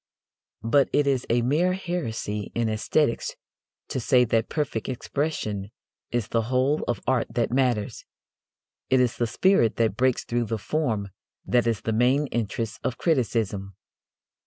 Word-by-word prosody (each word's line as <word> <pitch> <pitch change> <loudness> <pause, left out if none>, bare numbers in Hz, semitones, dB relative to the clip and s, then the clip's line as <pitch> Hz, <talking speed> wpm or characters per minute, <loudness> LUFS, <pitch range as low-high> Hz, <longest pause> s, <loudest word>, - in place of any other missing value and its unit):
But 130 +5 +3
it 145 - +3
is 135 -3 0
a 120 +1 +2
mere 160 +9 +2
heresy 115 - -3
in 115 -1 +1
æsthetics 115 +4 0 0.6
to - - -2
say 125 +1 +4
that 115 0 0
perfect 135 -8 -2
expression 120 -7 -3 0.4
is 120 -3 -2
the 115 - +1
whole 130 +5 +1
of 120 - -1
art 130 -3 +1
that 120 -1 +1
matters. 125 -5 0 0.9
It 130 - +4
is 125 -2 +1
the 120 - +1
spirit 120 - +3
that 110 -3 +1
breaks 130 0 +2
through 120 0 -1
the 115 0 -2
form 110 -5 -1 0.4
that 120 -1 +2
is 115 -3 0
the 110 - -1
main 125 +6 +3
interest 115 -1 -2
of 125 - -2
criticism. 110 - 0
120 Hz, 150 wpm, -25 LUFS, 110-135 Hz, 0.9 s, say